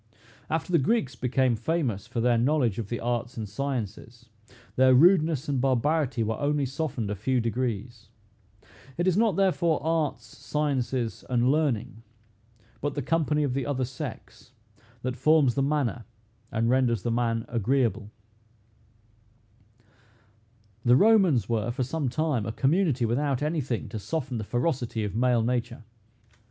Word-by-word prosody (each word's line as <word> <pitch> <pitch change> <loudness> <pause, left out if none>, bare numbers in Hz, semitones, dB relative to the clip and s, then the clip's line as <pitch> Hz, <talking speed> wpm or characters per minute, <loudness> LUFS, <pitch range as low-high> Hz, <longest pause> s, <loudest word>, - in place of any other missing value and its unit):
After 165 +3 -2
the 170 - +4
Greeks 140 - 0
became 125 0 +1
famous 120 - -2
for 115 - -3
their 120 -1 +3
knowledge 125 -5 +1
of 105 -3 -5
the 120 - -3
arts 120 0 -3
and 110 -2 -4
sciences, 120 0 -5 0.5
their 130 0 +5
rudeness 160 -1 +4
and 140 -3 0
barbarity 135 0 +1
were 110 0 -2
only 145 0 0
softened 130 -6 -3
a - - -2
few 125 +6 0
degrees. 115 -1 -3 0.9
It 175 - 0
is 185 -2 +2
not 215 -3 +2
therefore 170 -4 +2
arts, 160 -2 -1
sciences, 130 -5 -2
and 125 +1 +2
learning, 140 -7 -1 0.8
but 145 0 -2
the 145 - -2
company 150 0 +1
of 135 -3 -1
the 135 0 -2
other 130 -3 -1
sex, 125 -4 -9 0.5
that 130 0 -2
forms 155 -5 +4
the 135 - 0
manner 135 -5 -1 0.5
and 115 0 0
renders 120 -5 +2
the 120 - -1
man 115 -1 0
agreeable. 115 -2 0 2.7
The 120 +1 +5
Romans 190 - +4
were, 115 -1 -1
for 130 +2 -2
some 140 +1 -2
time, 135 -6 -1
a - - -2
community 140 - +1
without 135 +3 0
any 155 +1 0
thing 120 -3 -3
to 110 - -5
soften 130 0 -3
the - - -3
ferocity 120 -1 -1
of 105 -1 -4
male 120 -1 +2
nature. 120 0 -2
130 Hz, 145 wpm, -27 LUFS, 115-150 Hz, 2.7 s, their